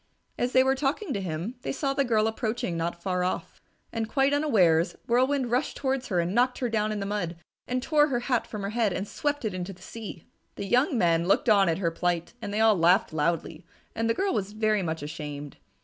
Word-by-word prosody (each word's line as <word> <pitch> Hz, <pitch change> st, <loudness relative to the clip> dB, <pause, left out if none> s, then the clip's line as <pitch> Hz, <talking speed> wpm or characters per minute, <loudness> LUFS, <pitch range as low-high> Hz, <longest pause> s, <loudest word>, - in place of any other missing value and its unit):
As 245 Hz, +1 st, -1 dB
they 260 Hz, -, +6 dB
were 265 Hz, 0 st, +3 dB
talking 280 Hz, +5 st, -1 dB
to 200 Hz, -, -2 dB
him, 180 Hz, +7 st, -4 dB
they -, -, -3 dB
saw 275 Hz, 0 st, -1 dB
the 275 Hz, -, +2 dB
girl 220 Hz, -4 st, +2 dB
approaching 220 Hz, -4 st, -2 dB
not 170 Hz, +1 st, -3 dB
far 180 Hz, -2 st, 0 dB
off. 180 Hz, -, -3 dB, 0.3 s
And 225 Hz, -1 st, -2 dB
quite 275 Hz, +2 st, +2 dB
unawares, 190 Hz, -, +3 dB
Whirlwind 255 Hz, +1 st, +2 dB
rushed 250 Hz, +2 st, 0 dB
towards 265 Hz, -1 st, -1 dB
her 180 Hz, -4 st, 0 dB
and 170 Hz, +2 st, 0 dB
knocked 250 Hz, +2 st, +2 dB
her 245 Hz, -, -1 dB
down 215 Hz, -1 st, 0 dB
in 210 Hz, -, -2 dB
the 200 Hz, -, -3 dB
mud 200 Hz, -4 st, -2 dB, 0.3 s
and 250 Hz, 0 st, -1 dB
tore 300 Hz, 0 st, +4 dB
her 245 Hz, -4 st, -1 dB
hat 245 Hz, -1 st, 0 dB
from 210 Hz, -2 st, -6 dB
her 200 Hz, -, -2 dB
head 220 Hz, -4 st, +1 dB
and 195 Hz, +3 st, -3 dB
swept 290 Hz, 0 st, -2 dB
it 210 Hz, -, -1 dB
into 185 Hz, +1 st, -4 dB
the 180 Hz, -, -19 dB
sea. 215 Hz, -7 st, -8 dB, 0.3 s
The 200 Hz, -, -5 dB
young 250 Hz, -, +2 dB
men 170 Hz, -3 st, +2 dB
looked 200 Hz, +5 st, +3 dB
on 200 Hz, -4 st, +5 dB
at 165 Hz, -, +1 dB
her 170 Hz, -3 st, 0 dB
plight 175 Hz, +2 st, -1 dB
and 205 Hz, -, -4 dB
they 210 Hz, -, -1 dB
all 220 Hz, -1 st, +5 dB
laughed 175 Hz, 0 st, +3 dB
loudly, 165 Hz, +1 st, -1 dB, 0.3 s
and 225 Hz, 0 st, -1 dB
the 230 Hz, -, +2 dB
girl 390 Hz, -1 st, 0 dB
was 200 Hz, 0 st, -2 dB
very 215 Hz, -1 st, +1 dB
much 160 Hz, -4 st, -3 dB
ashamed. 145 Hz, -2 st, -6 dB
215 Hz, 230 wpm, -27 LUFS, 175-250 Hz, 0.3 s, they